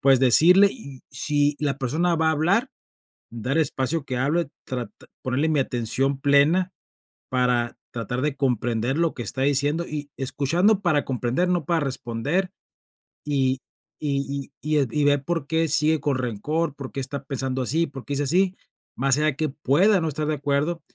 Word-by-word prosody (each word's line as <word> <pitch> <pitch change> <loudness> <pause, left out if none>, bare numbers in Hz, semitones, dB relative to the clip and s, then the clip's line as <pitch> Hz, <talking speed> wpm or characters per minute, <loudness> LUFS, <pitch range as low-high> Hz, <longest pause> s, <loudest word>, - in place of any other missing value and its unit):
pues, 135 -2 +4
decirle, 175 - +6
y, 140 - -11
si 145 +1 0
la 145 -2 0
persona 160 +7 0
va 160 0 +2
a - - +3
hablar, 185 - +1 0.6
dar 125 +6 -2
espacio 145 +1 0
que 130 -2 -3
hable, 145 +4 0 0.2
trat 125 -2 -4 0.3
ponerle 140 +5 0
mi 150 -3 +2
atención 130 +2 0
plena 145 +7 +3 0.6
para, 125 -2 0 0.2
tratar 120 +2 -3
de 150 -2 0
comprender 120 0 0
lo 165 -1 +1
que 120 - -5
está 130 +5 -3
diciendo 145 +4 +1
y 145 -1 -5
escuchando 170 +10 +1
para 155 -6 +1
comprender, 130 +6 -1
no 175 -5 0
para 165 -1 +1
responder. 135 +7 -2 0.8
Y 135 -3 +1 0.4
y 140 -1 -2 0.2
y 155 - -2
y - - +4 0.2
y - - +3
e - - +2
ver 145 -1 +3
por 165 -1 -2
qué 160 +1 +1
sigue 155 +1 +3
con 140 -2 0
rencor. 135 +6 -2
Por 140 -2 -8
qué 135 - -5
está 140 +2 -5
pensando 135 -1 -3
así. 160 +7 +1
Por 135 -2 -9
qué 145 - -4
es 140 - -1
así, 180 +6 +2 0.4
más 135 +1 +2
allá 155 -2 +1
que 155 +1 -1
pueda 170 - +2
no 160 - -1
estar 150 +1 -3
de 155 - 0
acuerdo. 145 +4 -1
145 Hz, 180 wpm, -24 LUFS, 130-160 Hz, 0.8 s, decirle